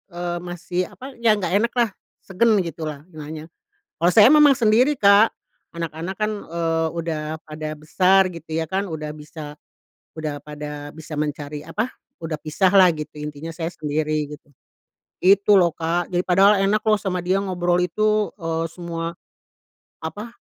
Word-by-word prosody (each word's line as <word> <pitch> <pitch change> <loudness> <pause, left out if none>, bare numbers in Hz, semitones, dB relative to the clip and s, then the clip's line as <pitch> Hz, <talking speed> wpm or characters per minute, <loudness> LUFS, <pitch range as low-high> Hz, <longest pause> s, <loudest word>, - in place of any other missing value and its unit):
eee, 175 0 -3
masih, 175 +1 -3
apa 265 +2 -10
ya 230 -2 +4
nggak 185 - -2
enak 235 +2 0
lah, 240 -2 +3 0.3
segan 220 +4 +2
gitu 165 -1 -6
lah 145 -2 -7
nanya. 155 0 -8 0.5
Kalau 175 +2 +2
saya 215 +2 +8
memang 300 -2 +7
sendiri, 235 +5 +4
Kak, 200 +1 +6 0.4
anak-anak 165 +3 -4
kan, 215 0 +1 0.2
eee, 165 -1 0
udah 160 -1 -3
pada 155 0 -6
besar 185 +5 +3
gitu 160 -1 -7
ya 165 - 0
kan 190 +3 -1
udah 155 -2 -5
bisa 150 0 -9 0.6
udah 150 -2 -4
pada 150 -1 -7
bisa 160 +1 -9
mencari, 150 0 -4
apa 210 +9 -2 0.3
udah 165 -1 -5
pisah 185 +5 +1
lah 185 -2 +8
gitu 155 -2 -6
intinya 150 +2 -6
saya 165 0 -3
sendiri 155 -1 -2
gitu. 145 - -18 0.7
Gitu 200 +2 +5
loh, 180 -3 +5
Kak. 165 +2 -2
Jadi 180 0 -1
padahal 195 +3 +5
enak 210 +2 +1
loh 215 -1 +3
sama 185 -3 -2
dia 185 +2 +1
ngobrol 180 -3 0
itu, 210 +4 +1
eee, 165 -3 -2
semua, 165 0 -5 0.9
apa 210 +8 -6
170 Hz, 160 wpm, -22 LUFS, 155-195 Hz, 0.9 s, saya